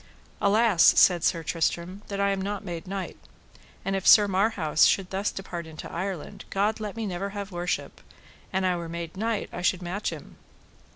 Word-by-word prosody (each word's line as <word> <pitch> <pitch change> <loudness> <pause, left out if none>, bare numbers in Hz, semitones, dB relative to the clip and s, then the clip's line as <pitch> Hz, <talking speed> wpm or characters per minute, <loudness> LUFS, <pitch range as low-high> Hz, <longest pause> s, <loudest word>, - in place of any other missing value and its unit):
Alas, 205 -3 +3 0.2
said 175 -3 +5
Sir 165 -1 +1
Tristram, 170 +4 -2
that 200 -1 -4
I 200 0 +2
am 195 -1 -1
not 205 +1 -4
made 175 0 -6
knight; 195 -1 -5 0.7
and 195 - 0
if 195 - -2
Sir 210 -2 +8
Marhaus 190 -5 +2
should 190 -2 +2
thus 195 +2 -1
depart 175 -3 -6
into 155 -1 -9
Ireland, 185 -2 -5
God 210 +3 0
let 210 -2 -5
me 225 -1 -3
never 195 0 -3
have 200 0 -5
worship: 175 0 -3 0.5
an 190 0 0
I 180 -1 +2
were 170 -1 -6
made 170 0 -6
knight 220 +1 -1
I 175 - -5
should 185 0 +1
match 185 +4 -2
him. - - -10
190 Hz, 185 wpm, -26 LUFS, 175-200 Hz, 0.7 s, Sir